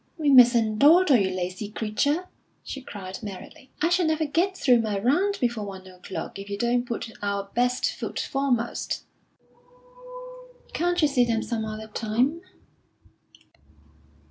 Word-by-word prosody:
"We 300 Hz, -3 st, +2 dB
mustn't 235 Hz, -4 st, +6 dB
dawdle, 310 Hz, -1 st, +6 dB
you 195 Hz, -3 st, +1 dB
lazy 185 Hz, +2 st, -4 dB
creature!" 235 Hz, +11 st, -1 dB, 0.4 s
she 275 Hz, -, -7 dB
cried 190 Hz, -6 st, -8 dB
merrily. 205 Hz, +6 st, -10 dB
"I 335 Hz, -, +3 dB
shall 350 Hz, -1 st, +2 dB
never 315 Hz, 0 st, +1 dB
get 355 Hz, +6 st, 0 dB
through 245 Hz, -3 st, +4 dB
my 215 Hz, -3 st, -2 dB
round 355 Hz, -, +1 dB
before 235 Hz, -3 st, -1 dB
one 190 Hz, -2 st, -8 dB
o'clock 185 Hz, +1 st, -8 dB
if 200 Hz, +1 st, -9 dB
we 200 Hz, -, -3 dB
don't 240 Hz, +2 st, 0 dB
put 230 Hz, -1 st, -4 dB
our 200 Hz, -1 st, -3 dB
best 245 Hz, +1 st, +1 dB
foot -, -, -5 dB
foremost." 260 Hz, -4 st, -1 dB, 1.7 s
"Can't 350 Hz, 0 st, 0 dB
you -, -, +6 dB
see 270 Hz, -3 st, +2 dB
them 230 Hz, -2 st, 0 dB
some 225 Hz, -2 st, -3 dB
other 215 Hz, 0 st, -6 dB
time?" 235 Hz, +9 st, -1 dB
240 Hz, 145 wpm, -25 LUFS, 210-285 Hz, 1.7 s, mustn't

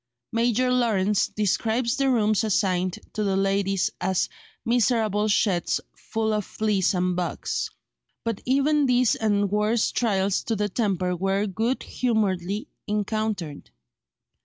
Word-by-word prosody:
Major 240 Hz, +2 st, +2 dB
Lawrence 210 Hz, -5 st, +2 dB
describes 225 Hz, +3 st, 0 dB
the 275 Hz, -1 st, +1 dB
rooms 215 Hz, -3 st, +2 dB
assigned 185 Hz, -3 st, +1 dB, 0.2 s
to 215 Hz, -, -1 dB
the 195 Hz, -1 st, +1 dB
ladies 195 Hz, -1 st, +1 dB
as 190 Hz, -1 st, +1 dB, 0.4 s
"miserable 225 Hz, -3 st, +2 dB
sheds 195 Hz, -4 st, +1 dB, 0.2 s
full 220 Hz, -1 st, -2 dB
of 210 Hz, -1 st, 0 dB
fleas 205 Hz, -2 st, 0 dB
and 180 Hz, 0 st, +1 dB
bugs." 170 Hz, -, -2 dB, 0.5 s
But 230 Hz, -3 st, -3 dB
even 280 Hz, +2 st, +2 dB
these 250 Hz, -1 st, +3 dB
and 205 Hz, -2 st, +1 dB
worse 210 Hz, +2 st, +1 dB
trials 195 Hz, -4 st, +1 dB
to 225 Hz, -, 0 dB
the 210 Hz, 0 st, -1 dB
temper 185 Hz, -4 st, 0 dB
were 195 Hz, +3 st, 0 dB
good 225 Hz, +6 st, -1 dB
humouredly 205 Hz, -4 st, -1 dB, 0.2 s
encountered. 210 Hz, -6 st, -2 dB
210 Hz, 125 wpm, -25 LUFS, 195-230 Hz, 0.5 s, these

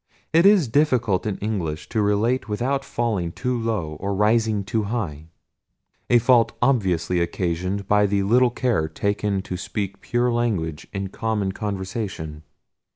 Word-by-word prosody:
It 165 Hz, +4 st, +6 dB
is 200 Hz, -8 st, +5 dB
difficult 115 Hz, -7 st, +2 dB
in 100 Hz, -, -2 dB
English 90 Hz, -8 st, -3 dB
to 110 Hz, -, 0 dB
relate 110 Hz, +5 st, +1 dB
without 130 Hz, +6 st, -1 dB
falling 110 Hz, -10 st, -1 dB
too 125 Hz, +7 st, -2 dB
low 110 Hz, -10 st, -2 dB
or 100 Hz, 0 st, -2 dB
rising 110 Hz, 0 st, +2 dB
too 110 Hz, +1 st, -1 dB
high; 85 Hz, -9 st, -4 dB, 0.8 s
a 120 Hz, -, +6 dB
fault 120 Hz, -1 st, +4 dB
obviously 90 Hz, -9 st, +1 dB
occasioned 90 Hz, +3 st, -2 dB
by 105 Hz, 0 st, +4 dB
the 100 Hz, 0 st, +1 dB
little 120 Hz, +5 st, +4 dB
care 120 Hz, -9 st, 0 dB
taken 100 Hz, +2 st, -1 dB
to 90 Hz, -, -5 dB
speak 100 Hz, +1 st, -4 dB
pure 120 Hz, 0 st, 0 dB
language 95 Hz, -10 st, -1 dB
in 100 Hz, -1 st, -4 dB
common 105 Hz, -2 st, -1 dB
conversation. 95 Hz, -6 st, -4 dB
105 Hz, 145 wpm, -23 LUFS, 95-120 Hz, 0.8 s, It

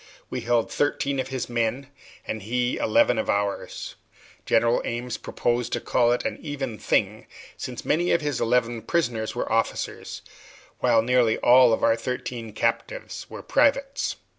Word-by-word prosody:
We -, -, -3 dB
held 120 Hz, -1 st, +1 dB
thirteen 140 Hz, -1 st, 0 dB
of 130 Hz, -, -1 dB
his 130 Hz, -2 st, -3 dB
men, 120 Hz, +4 st, -2 dB, 0.3 s
and 110 Hz, -, -4 dB
he 120 Hz, +4 st, -1 dB
eleven 110 Hz, +1 st, +3 dB
of -, -, -2 dB
ours. 100 Hz, 0 st, -2 dB, 0.5 s
General 115 Hz, +1 st, +3 dB
Ames 120 Hz, +1 st, -3 dB
proposed 120 Hz, 0 st, -1 dB
to -, -, 0 dB
call 120 Hz, -1 st, +2 dB
it 120 Hz, -, 0 dB
an -, -, -3 dB
even 135 Hz, -8 st, -4 dB
thing, -, -, 0 dB, 0.3 s
since -, -, -7 dB
many 175 Hz, +4 st, +1 dB
of 170 Hz, -, +3 dB
his 145 Hz, -4 st, -2 dB
eleven 120 Hz, -1 st, +1 dB
prisoners 120 Hz, -10 st, -1 dB
were 120 Hz, -, -3 dB
officers, 115 Hz, 0 st, -2 dB, 0.6 s
while 115 Hz, -1 st, +3 dB
nearly 120 Hz, -2 st, +3 dB
all 125 Hz, 0 st, +6 dB
our 115 Hz, -, +4 dB
thirteen 120 Hz, -1 st, -5 dB
captives -, -, -3 dB
were -, -, -8 dB
privates. 275 Hz, -1 st, +1 dB
120 Hz, 150 wpm, -25 LUFS, 115-135 Hz, 0.6 s, all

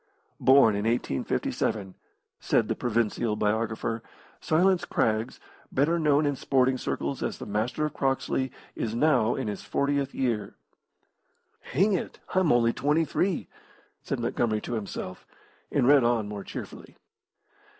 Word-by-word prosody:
Born 130 Hz, -5 st, +6 dB
in 100 Hz, +1 st, -2 dB
1857 105 Hz, -, -1 dB, 0.5 s
(said -, -, +1 dB
the -, -, 0 dB
provincial 115 Hz, -1 st, 0 dB
biographer), 110 Hz, +1 st, -1 dB, 0.4 s
Silas 180 Hz, +3 st, +2 dB
Craggs, 110 Hz, +1 st, 0 dB, 0.3 s
better 160 Hz, +6 st, +2 dB
known 150 Hz, -1 st, +3 dB
in 145 Hz, -1 st, +1 dB
sporting 130 Hz, -1 st, +1 dB
circles 70 Hz, -10 st, -3 dB
as -, -, -2 dB
the -, -, -7 dB
Master 115 Hz, +9 st, -1 dB
of 150 Hz, -, -3 dB
Croxley, 135 Hz, -1 st, -1 dB, 0.2 s
is 110 Hz, 0 st, -3 dB
now 125 Hz, -4 st, +3 dB
in 130 Hz, -, -3 dB
his 105 Hz, -, -4 dB
fortieth 140 Hz, -1 st, -1 dB
year. 115 Hz, -6 st, -1 dB, 1.0 s
"Hang 200 Hz, +3 st, +1 dB
it, 180 Hz, -, -3 dB
I'm 185 Hz, -4 st, +3 dB
only 115 Hz, -1 st, +3 dB
twenty 150 Hz, +3 st, +1 dB
three!" 180 Hz, +2 st, -1 dB, 0.5 s
said -, -, -3 dB
Montgomery 110 Hz, -3 st, 0 dB
to -, -, -5 dB
himself, 100 Hz, -4 st, -5 dB, 0.4 s
and -, -, +2 dB
read 140 Hz, -2 st, +6 dB
on 120 Hz, -3 st, +1 dB
more 105 Hz, -1 st, -6 dB
cheerfully. -, -, -9 dB
120 Hz, 135 wpm, -27 LUFS, 110-145 Hz, 1.0 s, Born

